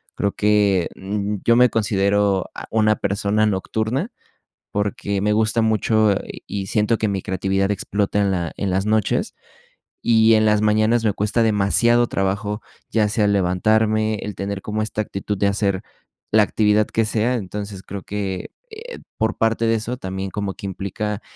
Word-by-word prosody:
creo 100 Hz, -, -1 dB
que, 100 Hz, -4 st, +2 dB
um, 100 Hz, +1 st, -3 dB
yo 115 Hz, -, +5 dB
me 125 Hz, 0 st, +6 dB
considero, 100 Hz, -2 st, +1 dB
ah, -, -, -8 dB
una 110 Hz, -1 st, +3 dB
persona 100 Hz, +2 st, 0 dB
nocturna 110 Hz, -, -2 dB, 0.6 s
porque 100 Hz, -1 st, -2 dB
me 105 Hz, -, +2 dB
gusta 110 Hz, +1 st, +2 dB
mucho, 110 Hz, -1 st, +2 dB
y -, -, -9 dB
y 100 Hz, -1 st, -4 dB
siento 110 Hz, +1 st, +1 dB
que 110 Hz, -, 0 dB
mi 100 Hz, -2 st, -2 dB
creatividad 95 Hz, +1 st, -1 dB
explota 100 Hz, +1 st, -1 dB
en 100 Hz, -1 st, +2 dB
la 85 Hz, -3 st, -2 dB
en 100 Hz, -, -2 dB
las 95 Hz, +1 st, 0 dB
noches 110 Hz, -1 st, 0 dB, 0.7 s
y 115 Hz, -1 st, +5 dB
en 110 Hz, -, +3 dB
las 105 Hz, -1 st, +3 dB
mañanas 110 Hz, +2 st, +2 dB
me 105 Hz, -, +3 dB
cuesta 105 Hz, +4 st, 0 dB
demasiado 115 Hz, +3 st, +3 dB
trabajo, 105 Hz, +2 st, -2 dB, 0.3 s
ya 105 Hz, -2 st, +2 dB
sea 105 Hz, 0 st, +1 dB
el 100 Hz, -, +2 dB
levantarme, 110 Hz, +4 st, +2 dB
el 105 Hz, -, -5 dB
tener 100 Hz, 0 st, -4 dB
como 110 Hz, 0 st, -2 dB
esta 110 Hz, 0 st, -2 dB
actitud 100 Hz, -1 st, -4 dB
de 100 Hz, -, +2 dB
hacer 100 Hz, -1 st, 0 dB, 0.5 s
la 110 Hz, 0 st, +6 dB
actividad 105 Hz, 0 st, +2 dB
que 115 Hz, -1 st, 0 dB
sea, 115 Hz, +3 st, 0 dB
entonces, 100 Hz, -2 st, -5 dB
creo 100 Hz, 0 st, -7 dB
que, 100 Hz, -3 st, -4 dB, 0.2 s
eh, 455 Hz, +2 st, -9 dB, 0.2 s
por 110 Hz, -1 st, 0 dB
parte 115 Hz, 0 st, +1 dB
de 115 Hz, -, +3 dB
eso, 115 Hz, +3 st, -3 dB
también 95 Hz, -2 st, -5 dB
como 100 Hz, -2 st, -3 dB
que -, -, -9 dB
implica 100 Hz, +2 st, -4 dB
105 Hz, 170 wpm, -21 LUFS, 100-110 Hz, 0.7 s, me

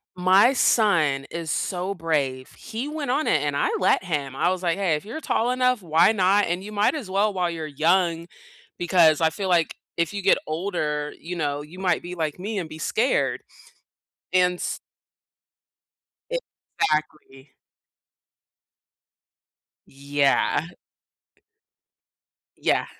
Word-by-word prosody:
my 190 Hz, +8 st, +5 dB
son 165 Hz, -, +2 dB
is 165 Hz, -3 st, -4 dB
so 185 Hz, +2 st, -2 dB
brave. 145 Hz, -7 st, -2 dB
He 235 Hz, +6 st, -6 dB
went 300 Hz, -4 st, -3 dB
on 290 Hz, +4 st, 0 dB
it, 150 Hz, -, +3 dB
and 145 Hz, -1 st, -1 dB
I -, -, +1 dB
let 190 Hz, -, +2 dB
him. 145 Hz, -7 st, -3 dB
I 175 Hz, -, +1 dB
was 185 Hz, 0 st, -2 dB
like, 170 Hz, 0 st, +1 dB
"Hey, 185 Hz, -6 st, +1 dB
if 150 Hz, -, -6 dB
you're 245 Hz, +9 st, -6 dB
tall 245 Hz, -2 st, 0 dB
enough, 250 Hz, -3 st, +1 dB
why 165 Hz, +3 st, +4 dB
not? 200 Hz, 0 st, +3 dB
And, 175 Hz, +2 st, -2 dB
you 210 Hz, -, -8 dB
might 210 Hz, +8 st, +1 dB
as 235 Hz, -11 st, -6 dB
well, 200 Hz, +2 st, +1 dB
while 180 Hz, -2 st, 0 dB
you're 160 Hz, -2 st, -5 dB
young, 165 Hz, +3 st, +1 dB, 0.5 s
because 170 Hz, -3 st, +4 dB
I 160 Hz, -, +4 dB
feel 190 Hz, +4 st, -4 dB
like 170 Hz, -2 st, +2 dB, 0.2 s
if 170 Hz, +3 st, -1 dB
you 200 Hz, -, -3 dB
get 195 Hz, -, +4 dB
older, 155 Hz, -3 st, -2 dB
you 175 Hz, +2 st, -6 dB
know, 145 Hz, -3 st, -2 dB
you 160 Hz, +5 st, -12 dB
might 180 Hz, -3 st, +1 dB
be 180 Hz, +1 st, -7 dB
like 160 Hz, -1 st, -3 dB
me, 210 Hz, +3 st, -4 dB
and 170 Hz, -4 st, -4 dB
be 155 Hz, -, -9 dB
scared," 235 Hz, +10 st, 0 dB, 0.9 s
and 180 Hz, -1 st, +3 dB
s -, -, -3 dB, 1.5 s
Exactly. 155 Hz, -, -4 dB, 2.4 s
Yeah. 140 Hz, +2 st, +1 dB, 1.9 s
Yeah. -, -, +1 dB
175 Hz, 140 wpm, -24 LUFS, 155-200 Hz, 2.4 s, my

